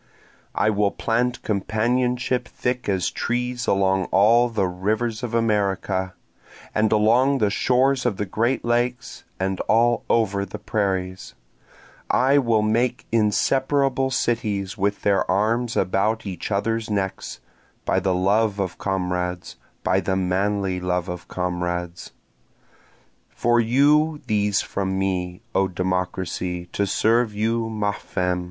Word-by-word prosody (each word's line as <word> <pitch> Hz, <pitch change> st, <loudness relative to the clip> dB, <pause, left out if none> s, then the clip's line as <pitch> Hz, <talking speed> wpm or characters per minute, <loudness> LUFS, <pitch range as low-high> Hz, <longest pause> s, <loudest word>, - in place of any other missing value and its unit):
I 110 Hz, -, +2 dB
will 105 Hz, -1 st, +2 dB
plant 120 Hz, +4 st, -1 dB
companionship 125 Hz, +4 st, 0 dB
thick 125 Hz, -2 st, -3 dB
as 95 Hz, -3 st, 0 dB
trees 125 Hz, 0 st, -2 dB
along 95 Hz, -1 st, +2 dB
all 115 Hz, +5 st, +4 dB
the 110 Hz, -4 st, 0 dB
rivers 110 Hz, +5 st, -2 dB
of 120 Hz, -2 st, -3 dB
America, 100 Hz, -4 st, 0 dB, 0.6 s
and 110 Hz, 0 st, +2 dB
along 120 Hz, +6 st, +4 dB
the 105 Hz, -5 st, +1 dB
shores 130 Hz, +4 st, +2 dB
of 115 Hz, -6 st, 0 dB
the 105 Hz, -, -2 dB
great 115 Hz, +7 st, -1 dB
lakes, 120 Hz, +1 st, -1 dB
and 95 Hz, 0 st, -1 dB
all 120 Hz, +1 st, +3 dB
over 100 Hz, -4 st, +2 dB
the 100 Hz, +2 st, -7 dB
prairies, 95 Hz, -4 st, -2 dB, 0.7 s
I 135 Hz, +3 st, +4 dB
will 115 Hz, -5 st, +2 dB
make 115 Hz, +2 st, 0 dB
inseparable 130 Hz, +5 st, +2 dB
cities 105 Hz, -6 st, -1 dB
with 100 Hz, 0 st, -1 dB
their 100 Hz, -1 st, +2 dB
arms 115 Hz, +5 st, +1 dB
about 105 Hz, +4 st, 0 dB
each 95 Hz, -4 st, -5 dB
other's 110 Hz, +2 st, -1 dB
necks, 100 Hz, -2 st, -3 dB, 0.5 s
By -, -, +2 dB
the 95 Hz, -1 st, 0 dB
love 100 Hz, +3 st, +1 dB
of 95 Hz, -2 st, -3 dB
comrades, 90 Hz, -2 st, -2 dB, 0.3 s
By -, -, +2 dB
the 95 Hz, -, -1 dB
manly 95 Hz, 0 st, 0 dB
love 90 Hz, 0 st, -2 dB
of 90 Hz, 0 st, -6 dB
comrades. 90 Hz, -1 st, -3 dB, 1.2 s
For 120 Hz, 0 st, +1 dB
you 145 Hz, +6 st, +3 dB
these 105 Hz, -1 st, +1 dB
from 95 Hz, -1 st, -3 dB
me, 95 Hz, 0 st, -2 dB
O 95 Hz, 0 st, +2 dB
Democracy, 90 Hz, -1 st, -2 dB
to 100 Hz, -, 0 dB
serve 115 Hz, +1 st, +2 dB
you 115 Hz, +2 st, 0 dB
ma 105 Hz, -2 st, -1 dB
femme! 90 Hz, -2 st, -2 dB
105 Hz, 130 wpm, -23 LUFS, 95-120 Hz, 1.2 s, all